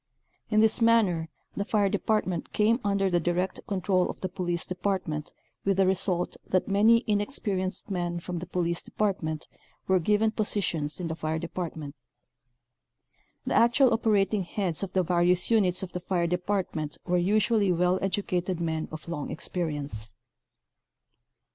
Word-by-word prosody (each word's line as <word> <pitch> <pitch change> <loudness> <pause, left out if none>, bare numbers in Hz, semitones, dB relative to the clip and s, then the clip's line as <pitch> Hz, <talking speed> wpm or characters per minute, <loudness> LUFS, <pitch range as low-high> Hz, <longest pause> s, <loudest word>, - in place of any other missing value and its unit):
In 215 -1 +4
this 220 +2 +4
manner 200 -8 +3 0.3
the 200 - -1
fire 205 -1 +2
department 195 -3 -1
came 220 +3 +3
under 200 -1 +1
the 175 -2 +2
direct 175 +2 -1
control 185 -2 +1
of - - -6
the 185 - -2
police 175 -2 -2
department 180 -5 -2 0.3
with 195 -1 +1
the 195 - +4
result 185 -1 0
that 185 - +1
many 220 +4 +5
in 210 -2 +2
experienced 200 -5 -3
men 175 -2 -2
from 175 0 -5
the 175 - -7
police 170 -1 -1
department 170 -7 -2 0.4
were 190 -1 +4
given 210 +5 +2
positions 185 -9 -1
in 175 - -3
the 160 - -2
fire 160 0 -2
department. 160 -3 -5 1.5
The - - -1
actual 240 +2 +5
operating 210 -3 +2
heads 180 -2 -2
of 195 -2 -4
the 185 - +2
various 180 +2 +2
units 190 -5 +2
of 185 - -5
the 180 - -2
fire 175 -1 0
department 180 -3 -2
were 180 -1 +2
usually 210 +2 +2
well 180 +1 +2
edu 195 +1 -1
cated 180 0 -1
men 160 -2 -2
of 155 +1 -8
long 150 -4 -4
experience. 145 - -4
185 Hz, 155 wpm, -27 LUFS, 170-205 Hz, 1.5 s, many